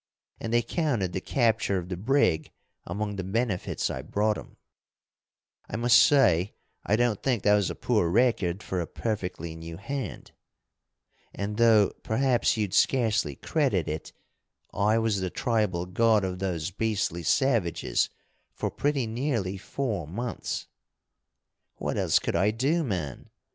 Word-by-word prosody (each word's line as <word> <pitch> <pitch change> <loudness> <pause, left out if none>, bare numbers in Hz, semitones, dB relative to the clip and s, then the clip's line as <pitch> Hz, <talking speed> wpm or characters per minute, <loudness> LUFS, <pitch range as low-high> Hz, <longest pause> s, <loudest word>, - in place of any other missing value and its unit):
And 115 - -4
they 120 0 +3
counted 125 - -1
the 95 - -2
capture 115 -5 +1
of 90 -1 -4
the 90 - -2
brig 100 - +1 0.4
among 105 +3 -3
the 95 - -3
benefits 100 0 -1
I - - -4
brought 105 +1 0
'em. - - -11 1.1
I - - -4
must 115 -2 +5
say 100 - +4 0.3
I 105 - +2
don't 120 -3 +1
think 125 -6 0
that 105 - +5
was 100 -3 +2
a - - -4
poor 105 -8 +1
record 100 -3 +1
for 95 -2 -2
a 85 - -4
perfectly 90 -7 -4
new 80 0 -8
hand. 125 +1 -5 1.0
And, 105 +1 -3
though 110 -3 +5
perhaps 120 0 +1
you'd 105 -3 -1
scarcely 110 - +2
credit - - 0
it, 80 +1 -4 0.6
I 105 +2 +2
was 110 -4 +1
the 95 - -1
tribal 105 -6 0
god 110 +3 +3
of 90 -1 -3
those 90 -3 -2
beastly 105 -4 -1
savages 110 - +1 0.5
for - - -2
pretty 145 -3 0
nearly 115 -5 -2
four 100 - -3
months.... 115 +8 -4 1.1
"What - - -3
else - - +3
could - - -1
I 95 +5 +3
do, 135 +10 +1
man? 90 - -4
105 Hz, 145 wpm, -27 LUFS, 90-120 Hz, 1.1 s, must